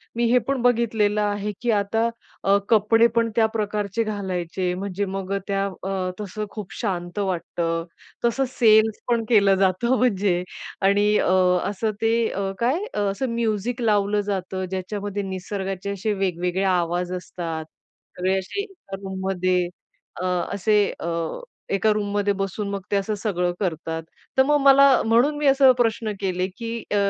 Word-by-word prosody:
मी 235 Hz, -, 0 dB
हे 250 Hz, -, +6 dB
पण 275 Hz, -2 st, 0 dB
बघितलेलं 225 Hz, -4 st, +2 dB
आहे 205 Hz, 0 st, -1 dB
की 240 Hz, -1 st, +1 dB
आता 215 Hz, +2 st, +1 dB, 0.4 s
अ, 200 Hz, +1 st, +4 dB
कपडे 225 Hz, +1 st, +5 dB
पण 230 Hz, 0 st, +2 dB
त्या 225 Hz, -, +4 dB
प्रकारचे 210 Hz, 0 st, -1 dB
घालायचे. 185 Hz, -4 st, -2 dB
म्हणजे 195 Hz, +1 st, -3 dB
मग 195 Hz, 0 st, -4 dB
त्या 195 Hz, -1 st, 0 dB, 0.2 s
अ, 190 Hz, -1 st, -2 dB
तसं 210 Hz, +1 st, -4 dB
खूप 205 Hz, -2 st, -8 dB
शांत 175 Hz, -4 st, -3 dB
वाटतं, 170 Hz, -3 st, -2 dB, 0.4 s
तसं 265 Hz, +3 st, +2 dB
सेल्स 220 Hz, -2 st, +5 dB
पण 235 Hz, -2 st, +1 dB
केलं 200 Hz, -4 st, +5 dB
जातं 195 Hz, +6 st, +2 dB
म्हणजे. 200 Hz, -7 st, +1 dB, 0.4 s
आणि 200 Hz, +1 st, +3 dB
अ, -, -, +2 dB, 0.4 s
असं 210 Hz, +2 st, -1 dB
ते 225 Hz, 0 st, +3 dB, 0.2 s
अ, 195 Hz, 0 st, -2 dB
काय 255 Hz, +8 st, +2 dB, 0.3 s
असं 245 Hz, +7 st, -2 dB
म्युझिक 230 Hz, +1 st, -1 dB
लावलं 210 Hz, -2 st, +2 dB
जातं. 190 Hz, -1 st, -2 dB
ज्याच्यामध्ये 200 Hz, +2 st, -4 dB
निसर्गाचे 190 Hz, +1 st, -4 dB
असे 200 Hz, +2 st, -1 dB
वेगवेगळे 180 Hz, -1 st, -1 dB
आवाज 175 Hz, +1 st, -1 dB
असतात. 165 Hz, -3 st, -5 dB, 0.5 s
सगळे 185 Hz, +1 st, +1 dB
असे 190 Hz, -, -4 dB
एका 390 Hz, -, -9 dB
रूममध्ये 190 Hz, -2 st, 0 dB, 0.5 s
अ, -, -, -2 dB, 0.3 s
असे 205 Hz, +2 st, +1 dB, 0.2 s
अ, -, -, -4 dB, 0.7 s
एका 215 Hz, +2 st, +3 dB
रूममध्ये 205 Hz, -1 st, 0 dB
बसून 195 Hz, +1 st, -3 dB
मग 200 Hz, 0 st, -3 dB
ते -, -, +2 dB
असं 200 Hz, +2 st, 0 dB
सगळं 185 Hz, -4 st, -1 dB
करतात. 165 Hz, -3 st, -3 dB, 0.3 s
तर 265 Hz, -, +7 dB
मग 295 Hz, +2 st, +3 dB
मला 275 Hz, 0 st, +7 dB, 0.2 s
म्हणून 240 Hz, +7 st, +3 dB
मी 295 Hz, -1 st, +1 dB
असे 270 Hz, -1 st, +7 dB
प्रश्न 225 Hz, -2 st, +1 dB
केले 185 Hz, -2 st, -1 dB
की 230 Hz, -1 st, -5 dB, 0.2 s
अ, -, -, +1 dB
200 Hz, 150 wpm, -23 LUFS, 185-225 Hz, 0.7 s, तर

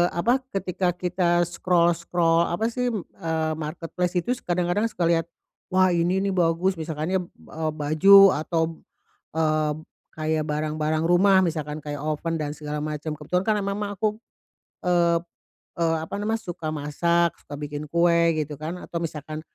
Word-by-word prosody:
apa? 235 Hz, +10 st, +2 dB
Ketika 185 Hz, -4 st, -1 dB
kita 175 Hz, -1 st, +1 dB
scroll-scroll 170 Hz, -1 st, +2 dB
apa 220 Hz, +7 st, -1 dB
sih 250 Hz, +1 st, -1 dB
m 220 Hz, -7 st, -2 dB, 0.2 s
eee 160 Hz, -1 st, -1 dB
marketplace 165 Hz, +3 st, -3 dB
itu 245 Hz, -, -2 dB, 0.2 s
kadang-kadang 180 Hz, +4 st, +1 dB
suka 195 Hz, -5 st, -3 dB
lihat, 165 Hz, -1 st, +2 dB, 0.5 s
"wah 185 Hz, 0 st, +5 dB
ini 175 Hz, +3 st, +1 dB
nih 200 Hz, -, 0 dB
bagus," 175 Hz, 0 st, +1 dB
misalkan 160 Hz, +1 st, -3 dB
ya 190 Hz, -, +2 dB, 0.3 s
e 160 Hz, -, -7 dB
baju 185 Hz, +7 st, +7 dB
atau, 160 Hz, +1 st, -1 dB, 0.6 s
eee, 155 Hz, -1 st, +1 dB, 0.4 s
kayak 155 Hz, 0 st, -1 dB
barang-barang 155 Hz, +1 st, -1 dB
rumah, 190 Hz, +3 st, +5 dB
misalkan 155 Hz, -3 st, -3 dB
kayak 145 Hz, -1 st, -5 dB
oven 155 Hz, +2 st, -2 dB
dan 150 Hz, -1 st, -3 dB
segala 150 Hz, -1 st, -5 dB
macem. 150 Hz, +1 st, -4 dB
Kebetulan 180 Hz, +5 st, -1 dB
kan 215 Hz, -, +2 dB
emang 200 Hz, 0 st, -2 dB, 0.2 s
aku, 215 Hz, +1 st, 0 dB, 0.7 s
eee, 170 Hz, -1 st, +3 dB, 0.6 s
eee, 165 Hz, -1 st, +2 dB
apa 160 Hz, -, -7 dB
namanya? 220 Hz, +2 st, -1 dB
Suka 170 Hz, -4 st, -6 dB
masak, 170 Hz, +3 st, +1 dB
suka 145 Hz, -, -9 dB
bikin 145 Hz, +1 st, -6 dB
kue, 170 Hz, 0 st, +3 dB
gitu 150 Hz, -2 st, -4 dB
kan. 160 Hz, +3 st, -4 dB
Atau 170 Hz, -, -5 dB
misalkan, 155 Hz, -1 st, -5 dB
170 Hz, 150 wpm, -25 LUFS, 155-180 Hz, 0.7 s, baju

